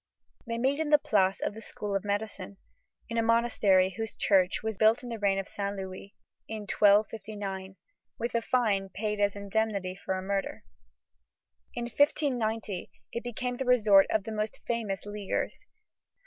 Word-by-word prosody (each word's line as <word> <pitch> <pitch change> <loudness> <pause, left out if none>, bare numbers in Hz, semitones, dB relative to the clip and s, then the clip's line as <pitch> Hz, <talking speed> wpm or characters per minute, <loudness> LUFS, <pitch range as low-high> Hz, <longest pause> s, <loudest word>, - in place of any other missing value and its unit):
They 230 0 -2
meet 265 +5 +1
in 315 -2 -1
the 300 - +7
Place 195 -8 +2
of - - -1
the 220 - -9
School 210 -2 -5
of 195 - 0
Medicine, 205 -1 -3 0.5
in 230 0 -1
a - - +4
monastery 220 -5 +3
whose 225 +1 -4
church 190 -1 +2
was 220 -1 -2
built 220 +7 +4
in 245 - -6
the 230 -1 -5
reign 200 -1 +2
of 195 0 -3
Saint 200 0 -3
Louis, 190 +1 -8 0.3
in 220 -1 -5
1259, 205 -2 +1 0.4
with 235 +1 -2
the 235 - +1
fine 215 -6 +1
paid 210 +2 -3
as 205 0 +2
indemnity 200 -2 -1
for 190 0 -3
a 185 - -4
murder. 195 0 -2 1.1
In 240 - -2
1590, 235 - 0 0.2
it 235 - -4
became 245 +1 -3
the 265 - -2
resort 215 -6 +6
of 215 - +1
the 220 - -6
most 215 0 -3
famous 220 -5 -2
Leaguers. 205 -1 -3
210 Hz, 165 wpm, -29 LUFS, 195-230 Hz, 1.1 s, the